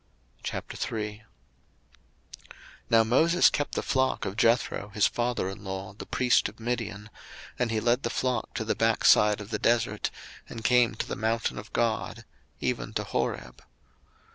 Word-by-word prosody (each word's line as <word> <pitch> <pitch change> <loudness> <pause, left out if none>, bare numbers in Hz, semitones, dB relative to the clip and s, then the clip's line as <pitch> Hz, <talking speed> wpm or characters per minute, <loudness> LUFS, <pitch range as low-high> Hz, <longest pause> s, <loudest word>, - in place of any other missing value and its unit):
02:003:001 105 -1 -4 1.7
Now 115 -1 +6
Moses 160 +10 +4
kept 145 - -2
the - - -1
flock 130 -1 +1
of 95 - -4
Jethro 115 -3 +1
his 105 - +4
father 120 -5 0
in 95 +1 -7
law, 95 0 -5
the 105 - -10
priest 125 -4 +2
of 105 - -18
Midian: 110 -3 -4 0.5
and 125 -2 +1
he 110 -1 0
led 120 +3 +2
the 120 - -2
flock 125 -2 -2
to 110 - -2
the 110 - +1
backside 110 -2 +4
of 105 +1 -9
the 105 - -1
desert, 115 -2 +1 0.4
and 115 - -7
came 120 0 +4
to - - -3
the - - -3
mountain 115 +1 -1
of 110 - -11
God, 115 -2 -1 0.3
even - - -2
to - - -1
Horeb. 60 0 -3
115 Hz, 155 wpm, -28 LUFS, 105-120 Hz, 1.7 s, Now